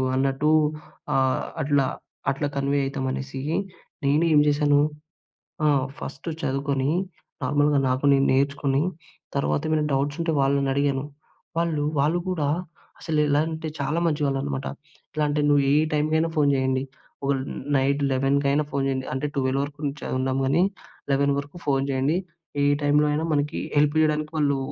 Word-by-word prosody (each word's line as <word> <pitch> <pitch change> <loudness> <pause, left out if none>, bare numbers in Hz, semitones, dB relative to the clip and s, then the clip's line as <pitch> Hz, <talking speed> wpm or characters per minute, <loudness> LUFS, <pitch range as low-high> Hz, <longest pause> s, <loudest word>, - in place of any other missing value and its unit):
అన్నట్టు 135 +3 +1 0.6
ఆహ్, 130 -1 +2 0.2
అట్లా, 140 -2 +2 0.5
అట్లా 145 +2 -2
కన్వే 140 +1 +1
అవుతామనేసి. 135 -1 -3 0.6
నేను 150 +4 +3
ఏం 150 - +7
చేసాను 145 0 +3 0.9
ఆహ్, 140 -2 +3
ఫస్ట్ 135 +5 -6
చదువుకొని, 135 -1 0 0.5
నార్మల్‌గా 145 +1 +3
నాకు 130 +2 0
నేను 135 0 +3
నేర్చుకొని, 140 +1 +1 0.5
తర్వాత 140 +1 +1
ఏమైనా 155 -1 +2
డౌట్స్ 145 +2 0
ఉంటే 165 -1 0
వాళ్ళని 140 0 +2
అడిగాను. 140 -1 +1 0.5
వాళ్ళు 165 -3 0 0.2
వాళ్ళు 155 +5 +2
కూడా 155 -6 0 0.5
అసలు 155 -2 0
ఎలా 145 +1 +3
అంటే, 160 0 -4
చాలా 150 +4 0
మంచి 150 -2 0
వాళ్ళనమాట. 135 0 -2 0.4
ఎట్లా 155 -1 -2
అంటే, 150 0 +1
"నువ్వు 145 -1 +4
ఏ - - +4 0.2
టైమ్‌కైనా 155 +2 +1
ఫోన్ 145 -1 +4
చేయండి. 130 0 +1 0.4
ఓహ్, 135 -1 +1 0.4
నైట్ 140 +2 +1
లెవెన్‍కైనా 140 +2 +2
ఫోన్ 140 -1 0
చేయండి," 130 -1 -1
అంటే 130 +3 -2
12:00 135 0 +1
వరకు 145 +1 -8
ఉంచ 140 +1 -3 0.2
ఉన్నాం 130 0 0
గానీ. 145 +7 +3 0.5
11:00 140 +1 +3
వరకు 140 +4 -8
ఫోన్ 135 -1 +2
చేయండి. 135 +6 +1 0.5
ఏ - - +4 0.2
టైమ్‌లో 145 +1 +4
అయినా 155 +2 0
మనకి 145 0 0 0.2
హెల్ప్ 145 +1 +3
చేయడానికి 155 0 +1
వాళ్ళు 140 -2 +2
140 Hz, 145 wpm, -24 LUFS, 135-150 Hz, 0.9 s, ఏం